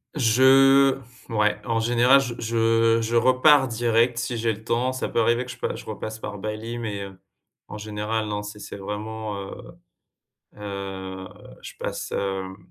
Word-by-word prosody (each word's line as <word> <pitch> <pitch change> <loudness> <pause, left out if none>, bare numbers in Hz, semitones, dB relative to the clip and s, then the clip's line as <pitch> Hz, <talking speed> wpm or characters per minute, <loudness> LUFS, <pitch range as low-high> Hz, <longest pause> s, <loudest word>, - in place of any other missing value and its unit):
Je 135 +2 +5 0.3
ouais, 105 -1 +1
en 115 -1 0
général, 120 +4 +5
je 125 -3 -4
je 115 0 +2
je 115 +1 -2
repars 130 +3 +5
direct 115 +1 +1
si 120 -1 -3
j'ai 115 0 0
le 110 - -12
temps. 120 +3 0
Ça 130 - -3
peut - - 0
arriver 120 +2 +2
que 125 - -12
je 125 - -10
passe - - -3
je - - -12
repasse 110 +1 -6
par 100 - -6
Bali, 110 +3 -5
mais, 105 -4 -4
heu, 95 -1 -12 0.5
en 105 - -8
général, 105 +1 -3
non, 105 0 -3
c'est 105 0 -8
c'est 100 - -8
vraiment, 105 +2 -5
heu - - -8 1.0
heu, 95 -2 -6 0.3
je - - -9
passe, - - -5
hem, 95 -1 -3
115 Hz, 170 wpm, -24 LUFS, 105-120 Hz, 1.0 s, Je